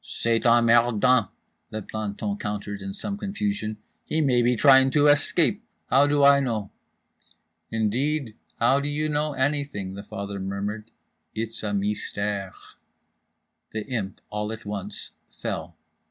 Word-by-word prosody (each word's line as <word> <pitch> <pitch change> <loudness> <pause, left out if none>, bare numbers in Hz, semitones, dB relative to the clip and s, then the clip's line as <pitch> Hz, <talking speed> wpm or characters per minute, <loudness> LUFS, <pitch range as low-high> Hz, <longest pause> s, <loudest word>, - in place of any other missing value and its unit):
—"C'est 115 0 0
emmerdant," 120 -1 +4 0.4
the 110 -1 -5
planton 105 -1 -3
countered, 105 -1 -4
in 95 0 -5
some 200 - -4
confusion—"he 195 - -3
may 130 -5 +3
be 120 +1 +3
trying 135 +1 +6
to 145 +2 +3
escape. 155 +8 +3 0.3
How 140 +3 +6
do 145 0 +2
I 140 0 +7
know?"—"Indeed, 115 +2 -4 0.2
how 125 +4 +4
do 145 +1 -2
you 155 +1 -1
know 150 0 0
anything?" 135 -8 -1
the 100 - -7
father 100 0 -6
murmured 100 +3 -4 0.5
quietly. 110 - -1
"It's 115 0 -4
a 105 - -2
mystère." 100 -1 -2 1.2
The 110 -1 -3
Imp, 105 -7 -4
all 105 0 -2
at 110 -1 -7
once, 100 0 -5 0.3
fell. - - -4
115 Hz, 130 wpm, -25 LUFS, 105-140 Hz, 1.2 s, I